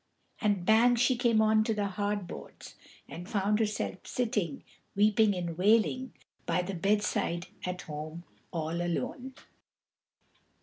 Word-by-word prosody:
And 205 -5 +1
bang 230 +4 +5
she 245 +2 +3
came 235 -3 +3
on 215 0 +4
to 220 0 -1
the 205 -1 0
hard 205 0 -2
boards, - - -10 0.3
and 175 +4 -9
found 210 -1 +1
herself 210 -4 -2
sitting, 210 - -1 0.3
weeping 210 0 +4
and 170 -2 -3
wailing, 225 +6 +3 0.3
by 170 +1 +1
the 195 +2 -4
bedside 185 -2 0 0.2
at 180 0 -4
home 155 +2 -7 0.3
all 165 0 -2
alone. 250 +9 -3
205 Hz, 130 wpm, -30 LUFS, 175-220 Hz, 0.3 s, bang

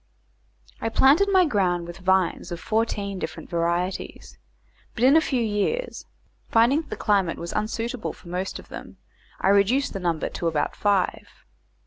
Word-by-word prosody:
I 225 - -1
planted 285 - +4
my 375 -2 +5
ground 185 - 0
with 175 +2 -9
vines 190 -2 +1
of 170 - -4
fourteen 205 -3 -1
different - - -7
varieties, 170 +2 -2 0.6
but, 235 - -2
in 265 +4 +6
a 320 - +6
few 260 -6 0
years, 225 - -2 0.4
finding 240 +7 +4
that - - -17
the - - -4
climate 195 -5 +1
was 170 - -6
unsuitable 225 +2 -3
for - - -17
most 180 +2 -3
of - - -14
them, - - -10 0.4
I - - +2
reduced 200 +8 +3
the 195 - -4
number 170 -3 -1
to 170 - -3
about 155 -2 -1
five. 200 -3 0
200 Hz, 160 wpm, -24 LUFS, 180-240 Hz, 0.6 s, in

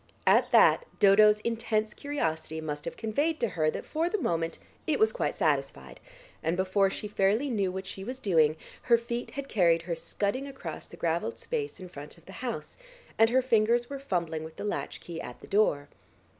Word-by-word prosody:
At - - +4
that - - +5
Dodo's 210 +1 +6
intense 220 -1 -1
curiosity 160 - -3
must 150 -2 -5
have - - -5
conveyed 290 +9 0
to 235 - +1
her 155 -4 +1
that - - -5
for 325 +2 -1
the 425 - 0
moment 165 - -1 0.3
it - - +2
was 440 -1 +4
quite - - -1
satisfied, - - -1 0.4
and 165 +2 0
before 190 +1 +2
she 210 - -5
fairly 210 +7 +1
knew 200 -5 0
what 190 +1 -5
she 190 0 -7
was 255 +5 -5
doing, 160 - +3 0.2
her 235 -2 +4
feet 235 +1 -4
had 280 -1 -4
carried 170 -7 +3
her 170 -1 -2
scudding 200 +10 -2
across 270 -1 -7
the - - -13
gravelled - - -1
space 440 - -4
in 185 - -8
front 150 -3 -10
of 170 - -21
the - - -11
house, 235 - -5 0.4
and 225 0 +6
her 260 +2 +3
fingers 240 +1 +2
were 275 - -4
fumbling 170 - -2
with 160 0 -9
the - - -7
latch 205 - -3
key 170 -1 -7
at 125 - -8
the - - -12
door. 170 -9 +2
205 Hz, 200 wpm, -29 LUFS, 170-245 Hz, 0.4 s, Dodo's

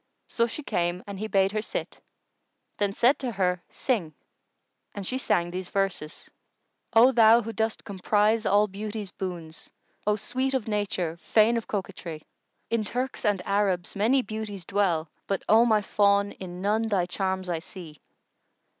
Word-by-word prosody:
So 235 0 +1
she 295 +6 -7
came 175 -4 -1
and 200 -1 -7
he 215 - -3
bade 195 -2 +2
her 215 0 -1
sit, - - -5 0.8
then 200 -1 0
said 260 +4 +4
to 250 -4 -3
her, 180 -2 0
"Sing." 185 - -2 0.8
And 200 -2 -5
she 255 +6 -1
sang 175 -8 +1
these 180 0 -5
verses, 195 -6 -2 0.6
"O 235 +3 +7
thou 230 -1 +6
who 225 +1 -5
dost 220 +1 -2
comprise 210 +3 +1
all 205 +2 +4
Beauty's 210 0 -6
boons! 170 -4 -7 0.2
* - - -31
O 210 - +4
sweet 255 +5 -1
of 250 -4 -1
nature, 190 -6 -1
fain 220 +6 +3
of 230 - -3
coquetry! 185 -6 -5 0.5
In 230 -2 +1
Turks 250 +4 -3
and 200 -3 +1
Arabs 195 -3 0
many 240 +6 +3
beauties 210 -4 -6
dwell; 180 -6 +1
* - - -44
But, 195 - -1
O 225 +2 +6
my 215 -3 +3
fawn, 200 0 +3
in 180 -1 -8
none 215 +3 +1
thy 195 -5 +1
charms 190 +1 -2
I 170 -2 -1
see. 160 -2 -11
205 Hz, 165 wpm, -27 LUFS, 185-220 Hz, 0.8 s, O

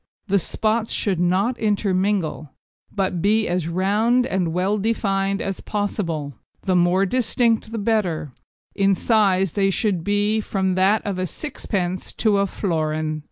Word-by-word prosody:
The 200 0 +2
spots 220 +5 -1
should 190 -5 0
not 190 +8 +1
intermingle, 195 -6 0 0.4
but 185 -4 -1
be 215 +3 +2
as 175 -2 -1
round 210 +8 +2
and 185 -7 -1
well 190 +5 0
defined 195 -2 0
as 195 -1 -4
possible, 170 -8 -3 0.3
the 185 -2 +1
more 180 +2 +3
distinct 230 0 +1
the 230 - -4
better; 195 - -1 0.4
in 195 0 +2
size 195 -4 +2
they 195 +2 +1
should 195 -3 0
be 205 +3 +1
from 190 -2 -1
that 195 +4 +2
of 195 -3 -2
a 185 - -1
sixpence 185 - -4
to 210 -3 +2
a 200 - +2
florin. 155 -5 -2
195 Hz, 145 wpm, -22 LUFS, 180-215 Hz, 0.4 s, more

